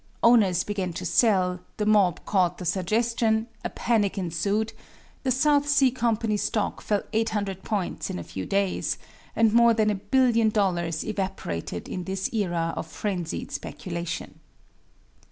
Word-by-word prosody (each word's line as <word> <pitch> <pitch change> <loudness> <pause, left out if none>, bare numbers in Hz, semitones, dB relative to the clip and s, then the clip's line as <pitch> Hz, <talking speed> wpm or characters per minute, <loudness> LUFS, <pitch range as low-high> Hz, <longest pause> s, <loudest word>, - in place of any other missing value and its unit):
Owners 205 -7 +5
began 190 -4 -3
to - - -5
sell, 185 -6 +3 0.2
the 210 - -1
mob 205 -5 +3
caught 180 -3 +1
the 180 - -7
suggestion, 220 +5 +1 0.2
a - - -2
panic 215 -5 0
ensued, 200 +5 -1 0.5
the 265 - -1
South 285 +3 +3
Sea 275 -3 +4
Company 230 -3 0
stock 210 0 -1
fell 205 -2 0
800 205 -4 -1
points 200 -4 -3
in - - -3
a 85 - -5
few 95 +2 -6
days, 195 -1 0 0.4
and 225 -1 +4
more 235 0 +6
than 215 -1 +3
a 195 -2 -4
billion 230 0 +3
dollars 175 -6 0
evaporated 190 - -4
in 180 -1 -5
this 190 +2 -3
era 175 -6 0
of - - -4
frenzied 180 -6 -4
speculation. 170 -2 -5
205 Hz, 145 wpm, -26 LUFS, 180-225 Hz, 0.5 s, more